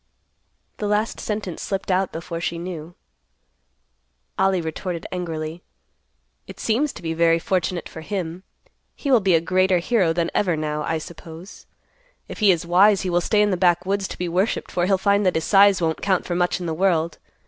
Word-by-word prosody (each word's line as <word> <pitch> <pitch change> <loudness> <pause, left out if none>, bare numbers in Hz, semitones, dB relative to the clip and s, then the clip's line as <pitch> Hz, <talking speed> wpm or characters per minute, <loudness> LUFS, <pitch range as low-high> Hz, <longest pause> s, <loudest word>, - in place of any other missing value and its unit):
The 210 - -3
last 210 +2 0
sentence 210 -5 -4
slipped 195 -1 -3
out 185 0 +1
before 165 +1 -6
she 170 -1 -2
knew. 170 -1 -7 1.4
Ollie 190 -1 +3
retorted 170 +1 -4
angrily, 165 -2 -4 0.9
"It - - -11
seems 260 +6 +1
to - - -11
be 165 -1 -2
very 165 0 +3
fortunate 180 0 -1
for 160 - -10
him. 175 -1 -4 0.5
He 280 - -3
will 250 - +6
be 190 -4 +3
a - - +5
greater 185 +2 +2
hero 180 -1 +2
than 170 0 -1
ever, 180 -5 +1
now, 150 0 -2
I 160 +2 -1
suppose. 165 +2 -11 0.6
If - - -8
he 210 -3 +6
is 170 -2 -1
wise, 195 +4 +5
he 185 - -2
will 175 0 +2
stay 210 +4 +2
in 205 - +1
the 185 - 0
backwoods 185 +2 +1
to - - -8
be 180 - -2
worshipped 185 +6 -1
for 175 0 0
he'll 195 -1 +3
find 200 +2 +2
that 185 - +2
his 160 - 0
size 200 -2 +5
won't 160 -1 -1
count 190 -3 +1
for 175 - -3
much 175 +1 0
in 180 - -5
the 165 - -2
world. 170 -2 0
180 Hz, 190 wpm, -22 LUFS, 165-195 Hz, 1.4 s, will